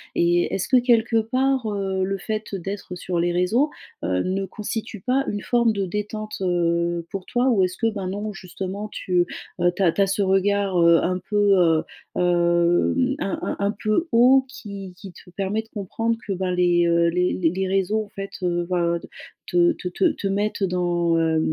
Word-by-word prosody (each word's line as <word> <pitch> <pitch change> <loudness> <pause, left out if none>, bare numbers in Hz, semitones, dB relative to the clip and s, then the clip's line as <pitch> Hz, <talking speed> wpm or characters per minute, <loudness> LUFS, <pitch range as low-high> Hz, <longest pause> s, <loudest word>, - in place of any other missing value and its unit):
et 175 0 +2
est-ce 190 - -2
que 255 - +5
quelque 235 -2 +3
part, 260 +2 0
heu, 195 -2 -1
le 195 +1 -1
fait 215 +1 -4
d'être 195 0 -6
sur 180 -1 -3
les 175 +1 +1
réseaux, 200 - +2 0.3
heu, 90 0 0
ne 195 +1 -1
constitue 215 +2 -5
pas 260 +5 +1
une 205 - -3
forme 235 -2 +2
de 200 -2 -1
détente, 210 +3 -4
heu, 170 -1 0
pour 195 -2 -6
toi? 250 +1 +1
Ou 200 -5 +3
est-ce 185 0 -2
que 230 - -1
ben 195 -3 -4
non 205 +3 -4
justement 190 +2 -6
tu, 180 -3 0 0.3
heu 175 0 +4
tu 200 - 0
as 170 - +5
tu 200 - -1
as 195 - +4
ce 200 +1 0
regard, 195 0 +1
heu, 170 0 +6
un 185 +1 0
peu, 205 -1 +3
heu, 165 -2 +3 0.3
hem, 175 +9 +2
un 195 - -2
un - - -2
un 200 - +2
peu 215 +11 +1
haut 255 +3 +6
qui 200 - -9
qui 195 -2 -11
te - - -16
permet 195 +4 -2
de 225 - -23
comprendre 225 +3 -2
que 200 - -1
ben 185 0 -2
les, 175 -1 +3
heu, 170 0 +3
les 180 +1 +1
les 185 +2 0
réseaux 195 +3 +1
en - - -20
fait, 195 -2 -7
heu, 175 -1 0
ben 170 -1 +1
d - - -12 0.4
te 175 -1 +3
te - - -7
te 275 - 0
te 280 - -8
mettent, 200 +1 -1
heu, - - +3
dans, 175 -2 0
heu, 160 -1 +2
195 Hz, 205 wpm, -23 LUFS, 175-215 Hz, 0.4 s, heu